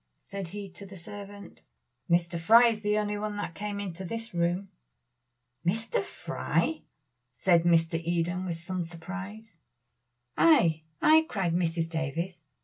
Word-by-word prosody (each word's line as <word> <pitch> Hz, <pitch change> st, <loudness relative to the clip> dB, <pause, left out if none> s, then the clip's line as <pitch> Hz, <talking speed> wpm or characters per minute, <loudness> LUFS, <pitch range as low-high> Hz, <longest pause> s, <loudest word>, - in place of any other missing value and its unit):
said 195 Hz, -2 st, -5 dB
he 200 Hz, +3 st, -6 dB
to 190 Hz, +2 st, -11 dB
the 195 Hz, 0 st, -10 dB
servant. 200 Hz, +3 st, -10 dB, 0.5 s
"Mr. 170 Hz, 0 st, +2 dB
Fry 230 Hz, +8 st, +7 dB
is 220 Hz, -2 st, -3 dB
the 210 Hz, 0 st, +1 dB
only 210 Hz, -1 st, -1 dB
one 210 Hz, 0 st, -3 dB
that 205 Hz, -5 st, -4 dB
came 205 Hz, +2 st, -4 dB
into 190 Hz, -2 st, -5 dB
this 225 Hz, +4 st, -5 dB
room." 175 Hz, +3 st, 0 dB, 0.9 s
"Mr. 225 Hz, -, 0 dB
Fry!" 315 Hz, -1 st, -1 dB, 0.5 s
said 170 Hz, -2 st, +3 dB
Mr. 165 Hz, -1 st, +3 dB
Eden, 175 Hz, +2 st, 0 dB
with 170 Hz, -3 st, -3 dB
some 185 Hz, +2 st, -3 dB
surprise. 190 Hz, +4 st, -8 dB, 0.8 s
"Ay! 170 Hz, -, +5 dB, 0.2 s
ay!" 315 Hz, +1 st, +7 dB
cried 185 Hz, -5 st, 0 dB
Mrs. 165 Hz, -1 st, 0 dB
Davies. 165 Hz, +2 st, -3 dB
185 Hz, 140 wpm, -29 LUFS, 170-205 Hz, 0.9 s, Fry